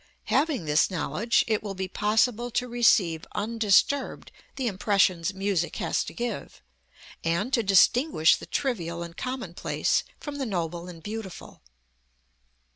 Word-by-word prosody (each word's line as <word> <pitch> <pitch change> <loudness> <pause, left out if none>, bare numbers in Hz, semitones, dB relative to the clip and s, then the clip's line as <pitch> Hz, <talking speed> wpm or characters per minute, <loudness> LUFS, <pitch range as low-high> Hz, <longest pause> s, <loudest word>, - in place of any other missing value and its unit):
Having 280 - +1
this 150 +1 +3
knowledge 185 - +1
it 215 -2 +1
will 200 -2 -6
be 190 0 -3
possible 225 +4 +1
to 245 +2 -1
receive 205 -9 +3
undisturbed 225 +5 +1 0.2
the 265 - -3
impressions 190 -4 +2
music 195 -3 -1
has - - -1
to - - -7
give, 235 -3 -5 0.6
and 170 +10 -1
to 235 - +4
distinguish 200 - +4
the - - -10
trivial 170 - -2
and 170 0 -9
commonplace 255 +4 -1 0.2
from 290 -1 -6
the 275 - -2
noble 175 -3 -3
and 165 -3 -11
beautiful. 210 -2 -8
205 Hz, 130 wpm, -26 LUFS, 175-240 Hz, 0.6 s, to